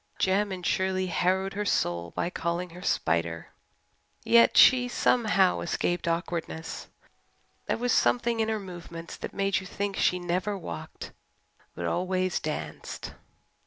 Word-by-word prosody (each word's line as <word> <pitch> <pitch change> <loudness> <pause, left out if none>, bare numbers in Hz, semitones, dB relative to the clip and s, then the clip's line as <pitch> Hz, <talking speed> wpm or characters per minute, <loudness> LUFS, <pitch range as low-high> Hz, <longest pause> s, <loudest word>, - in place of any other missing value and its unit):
Jem 200 +2 +1
and 180 -2 -5
Shirley 190 0 +1
harrowed 185 +2 0
her 205 +1 -2
soul 85 - 0
by 175 - -3
calling 170 +1 -2
her 180 +2 -11
"Spider." 85 - 0 0.7
Yet 235 0 +5
she 250 -1 +7
somehow 215 -6 +2
escaped 175 +1 -1
awkwardness. 165 -1 -3 0.8
There - - 0
was 245 +1 0
something 235 -1 +2
in 220 0 +1
her 220 -1 0
movements 170 -3 -8
that - - -6
made 195 -1 0
you 190 - -9
think 200 +1 -3
she 180 - +2
never 180 +3 -1
walked 85 - -7 0.6
but 85 - -4
always 185 - 0
danced. 80 - -5
185 Hz, 135 wpm, -28 LUFS, 170-200 Hz, 0.8 s, she